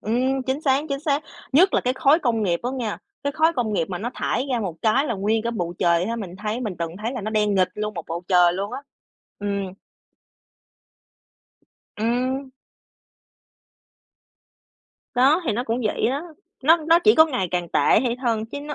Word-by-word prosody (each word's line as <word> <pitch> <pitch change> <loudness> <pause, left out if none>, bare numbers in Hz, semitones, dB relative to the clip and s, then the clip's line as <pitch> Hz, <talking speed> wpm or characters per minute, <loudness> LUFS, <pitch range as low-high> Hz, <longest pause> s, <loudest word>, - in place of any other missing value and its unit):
Ừm, 255 +5 0
chính 265 +2 -1
xác, 275 0 +2
chính 275 -1 -2
xác. 295 -1 0 0.3
Nhất 355 +8 +5
là - - +3
cái 250 - 0
khói 280 +4 +4
công 230 -4 +1
nghiệp 175 -4 0
á 245 - -2
nghe. 225 -5 -3 0.3
Cái 285 0 -1
khói 320 +3 +3
công 230 -3 0
nghiệp 190 - +1
mà 180 -2 -4
nó 235 +4 -3
thải 260 - -1
ra 240 - 0
một 190 -6 -3
cái 255 +6 +3
là 235 - -1
nguyên 215 +3 0
cả 235 - -1
bầu 175 -7 -3
trời 170 +1 +2
ha, 230 +1 -2
mình 190 -5 -7
thấy 215 +4 -3
mình 215 -6 -3
từng 170 -1 -2
thấy 230 +3 -2
là 250 - -4
nó 215 +1 -4
đen 210 -1 +1
nghịt 185 -2 +3
luôn 210 0 -4
một 170 -3 -5
bầu 170 +1 -4
trời 180 -2 +5
luôn 195 +3 -4
á. 275 - -5 0.6
Ừm. 200 -2 -3 2.2
Ừm. 255 +4 -1 2.6
Đó, 270 +7 +4
thì - - +2
nó 240 +4 -2
cũng 235 0 -1
vậy 210 - 0
đó. 275 +4 -2 0.4
Nó 320 +5 +6
nó 330 +1 +3
chỉ 430 - +7
có 315 - +8
ngày 225 - -2
càng 175 -1 -2
tệ - - +1 0.2
hay 240 -1 -1
hơn, 225 -3 0
chứ 285 +5 -7
nó 295 +1 -6
230 Hz, 200 wpm, -23 LUFS, 200-270 Hz, 2.6 s, có